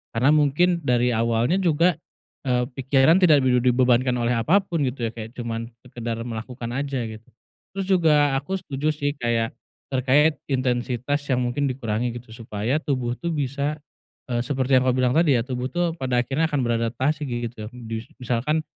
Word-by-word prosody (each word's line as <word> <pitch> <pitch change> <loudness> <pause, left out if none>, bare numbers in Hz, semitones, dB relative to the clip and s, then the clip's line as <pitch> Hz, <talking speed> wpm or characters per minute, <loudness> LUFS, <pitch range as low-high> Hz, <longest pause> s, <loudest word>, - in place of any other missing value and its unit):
Karena 125 +5 +4
mungkin 155 +4 +3
dari 125 -3 +2
awalnya 115 +9 +1
juga, 170 0 +3 0.5
eee, 125 -1 +2
pikiran 135 +6 +3
tidak 155 -6 +5
bibi 125 -1 +3
dibebankan 125 0 +3
oleh 120 0 +1
apa 120 - +3
pun, 170 -4 -2
gitu 125 -3 -1
ya, 115 - -2
kayak 115 +1 -8
cuman 115 -1 -4 0.2
sekedar 120 -2 -5
melakukan 120 +1 -6
aja, 135 -1 -2
gitu. 110 0 -9 0.5
Terus 195 -1 -2
juga 165 -5 +4 0.2
aku 165 +8 -4
setuju 145 -5 -4
sih, 145 -1 -1
kayak 115 -1 0 0.4
terkait 140 +4 +3
intensitas 125 +1 -1
yang 125 -2 +1
mungkin 125 +4 0
dikurangi, 120 -2 -2
gitu, 120 -1 -10
supaya 115 +4 -2
tubuh 130 -6 -2
tuh 170 -1 -2
bisa, 140 +1 -1 0.6
eee, 120 - +1
seperti 130 0 +2
yang 130 - -1
kamu 125 - +3
bilang 130 -1 +2
tadi, 160 -4 +4
ya, 115 - +1
tubuh 125 0 -3
tuh 175 +3 -1
pada 125 -2 +1
akhirnya 140 +6 0
akan 145 -3 -1
beradaptasi, 120 +6 -1
gitu, 120 -3 -4
njus 115 -2 -6
misalkan 125 +6 -1
125 Hz, 170 wpm, -23 LUFS, 120-145 Hz, 0.6 s, tidak